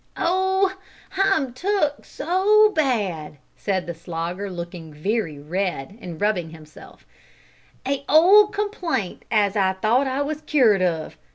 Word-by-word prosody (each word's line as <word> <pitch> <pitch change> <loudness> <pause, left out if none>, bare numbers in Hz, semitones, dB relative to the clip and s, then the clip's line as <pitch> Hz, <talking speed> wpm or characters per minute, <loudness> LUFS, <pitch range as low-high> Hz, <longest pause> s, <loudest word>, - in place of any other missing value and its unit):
"Oh! 380 +2 +1 0.4
I'm 385 -10 +1
took 300 -1 -1
so 415 +5 +3
bad," 205 - -1 0.2
said 190 -3 -2
the 170 - -5
Slogger, 170 +4 -5
looking 170 -2 -7
very 165 +1 -2
red, 170 +1 -3
and 170 -3 -8
rubbing 195 -6 0
himself; 155 -1 -15 0.8
"a 275 0 -1
old 390 +7 +6
complaint 365 - -3
as 205 -2 +2
I 190 -2 +2
thought 225 +8 +1
I 265 +2 -1
was 305 +1 -4
cured 250 -11 +3
of. 165 -3 -1
215 Hz, 125 wpm, -23 LUFS, -, 0.8 s, old